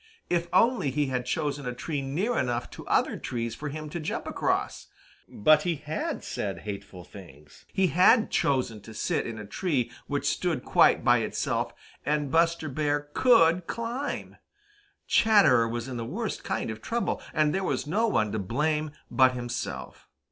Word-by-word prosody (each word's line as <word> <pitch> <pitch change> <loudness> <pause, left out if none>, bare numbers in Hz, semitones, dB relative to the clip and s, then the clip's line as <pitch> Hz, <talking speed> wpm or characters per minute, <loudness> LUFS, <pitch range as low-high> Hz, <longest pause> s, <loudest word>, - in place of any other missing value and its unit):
If 170 -1 +1
only 235 - +3
he 145 +2 0
had 125 0 -2
chosen 145 0 -2
a 125 - -3
tree 145 +2 -3
near 175 - -1
enough 120 -1 -1
to - - -10
other - - +2
trees 115 -2 -3
for 145 +5 -5
him 155 +1 -6
to 170 - -4
jump 155 - -3
across! - - -1 0.4
But 150 +8 +4
he 170 +1 0
had 150 +1 -4
said 95 -4 -4
hateful 100 -3 -7
things, 75 -6 -15
he 190 -1 +2
had 215 +6 +5
chosen 125 -6 0
to 110 +2 -12
sit - - -1
in 115 -1 -6
a 105 - -7
tree 135 - -1 0.2
which 145 -1 -2
stood 165 -4 -1
quite - - +4
by - - +5
itself, - - -1 0.3
and 150 -2 0
Buster 165 -1 +2
Bear 145 +1 -1
could 180 -9 +4
climb! 240 +5 -4 0.7
Chatterer 145 - +5
was 120 +1 -4
in 130 -2 -5
the 115 - -3
worst 115 - -4
kind - - -2
of 110 0 -8
trouble, 235 0 -2
and 155 -1 +2
there 195 - -1
was - - -1
no 210 +10 +1
one 110 - +1
to 110 - -2
blame 150 +9 0 0.2
but 130 -1 +5
himself. 120 -1 -5
145 Hz, 170 wpm, -27 LUFS, 120-170 Hz, 0.7 s, had